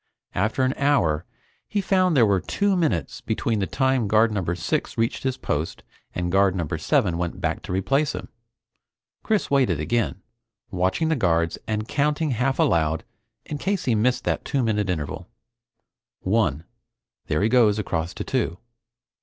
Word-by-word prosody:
After 110 +7 0
an 130 +1 +2
hour, 90 - +2 0.4
he 210 - -1
found 185 -4 +2
there 120 - +6
were 100 -3 +2
two 200 -1 0
minutes 165 -4 -1
between 110 0 -1
the 95 - 0
time 130 -4 +1
Guard 110 +2 +4
Number 90 -4 -1
Six 85 -2 -2
reached 115 0 0
his 130 -1 -1
post 75 - -3 0.3
and 90 0 -1
Guard 95 0 +3
Number 85 -5 -2
Seven 85 -1 +1
went 85 -1 -3
back - - -1
to - - -7
replace 135 +11 +1
him. - - -7 0.9
Chris 215 -8 0
waited 125 - +3
again, 95 +4 -1 0.5
watching 95 - 0
the 160 - +2
guards 85 - +1
and 110 0 -2
counting 150 +2 0
half 130 +3 0
aloud 80 -1 +2 0.4
in 150 - -5
case 195 +2 -1
he 125 - +2
missed 120 +4 +1
that - - -1
two 135 -3 0
minute 105 -3 0
interval. 85 +1 -3 0.9
"One 95 -7 +1 0.6
there 75 +5 +1
he 110 - +3
goes 115 -4 +4
across 85 -5 -2
to - - -4
Two. 85 - -1
110 Hz, 160 wpm, -24 LUFS, 90-135 Hz, 0.9 s, there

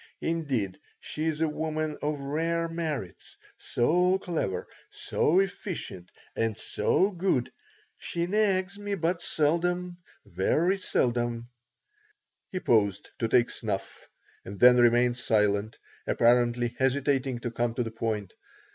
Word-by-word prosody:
Indeed, 135 - -2 0.2
she 155 - -4
is 160 -1 -1
a 160 - +3
woman 155 0 -2
of 150 0 -1
rare 165 +4 -1
merits, 155 - -5 0.2
so 180 +9 +2
clever, 160 - -3 0.2
so 175 +5 +1
efficient, 185 - -4 0.3
and 115 -2 -1
so 195 +2 +1
good. 175 -9 0 0.5
She 170 0 -2
nags 200 0 +1
me 205 0 -2
but 170 0 -1
seldom, 175 +3 0 0.3
very 155 - +1
seldom." 120 -6 0 1.0
He 185 - -2
paused 100 - +1
to 115 - +1
take 120 +1 +3
snuff 105 -4 -5 0.3
and 100 +1 -9
then 125 0 +8
remained 120 0 +4
silent, 105 -1 +1 0.3
apparently 120 0 +2
hesitating 135 -1 +1
to 120 - -3
come 120 0 -1
to 125 - 0
the 115 - -5
point. 110 -4 -3
135 Hz, 120 wpm, -28 LUFS, 115-170 Hz, 1.0 s, then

